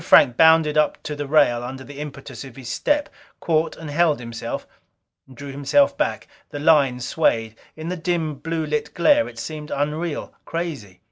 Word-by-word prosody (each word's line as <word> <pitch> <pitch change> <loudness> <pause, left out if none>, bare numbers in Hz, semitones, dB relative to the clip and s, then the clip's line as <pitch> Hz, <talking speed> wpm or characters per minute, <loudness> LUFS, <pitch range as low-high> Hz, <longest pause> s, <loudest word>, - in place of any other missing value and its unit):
Frank 120 - +6
bounded 160 0 +5
up 150 - +2
to 150 - -4
the 145 -1 -4
rail 120 -5 +4
under 130 +2 -6
the 145 +1 -10
impetus 140 -4 -7
of 130 -3 -11
his 130 -3 -8
step; 295 - +1 0.3
caught 160 -1 0
and 160 -2 -7
held 160 -2 +2
himself. 115 -1 -5 0.7
Drew 140 +2 -8
himself 275 - +2
back. - - -2 0.2
The - - -6
line 145 -4 +4
swayed. 115 -5 +1 0.2
In 160 +1 -6
the 180 - -3
dim, 165 -2 -1
blue 165 -1 -2
lit 150 0 -2
glare 290 +11 +4
it - - -14
seemed 155 -1 -6
unreal, 150 +2 -2
crazy. 145 - -5
150 Hz, 175 wpm, -22 LUFS, 135-165 Hz, 0.7 s, Frank